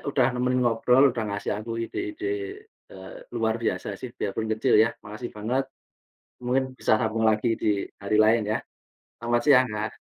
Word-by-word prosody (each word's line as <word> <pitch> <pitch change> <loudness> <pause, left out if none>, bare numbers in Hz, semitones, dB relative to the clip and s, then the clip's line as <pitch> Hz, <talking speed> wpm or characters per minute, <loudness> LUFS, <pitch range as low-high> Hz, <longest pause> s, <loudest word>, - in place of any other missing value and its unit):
udah 130 -3 +3
nemenin 125 +1 +1
ngobrol 125 +3 +4
udah 115 -3 -3
ngasih 100 - -3
aku 115 +2 -6
ide-ide, 355 - -5 0.7
eee, - - -10 0.2
luar 110 0 +1
biasa 90 -4 -1
sih 125 - -6
biar 100 - -2
pun 110 - -1
kecil 120 +4 +2
ya. 115 - +3 0.2
Makasih 110 +4 -7
banget, 125 +6 -1 0.8
mungkin 130 +2 +1
bisa - - +3
sambung 110 -1 0
lagi 110 +2 +2
di 105 - +3 0.3
hari 100 - -1
lain 110 +1 +4
ya, - - +1 0.6
selamat 120 +1 +1
siang, 130 -3 +6
Kak. 105 0 -4
115 Hz, 165 wpm, -26 LUFS, 110-125 Hz, 0.8 s, siang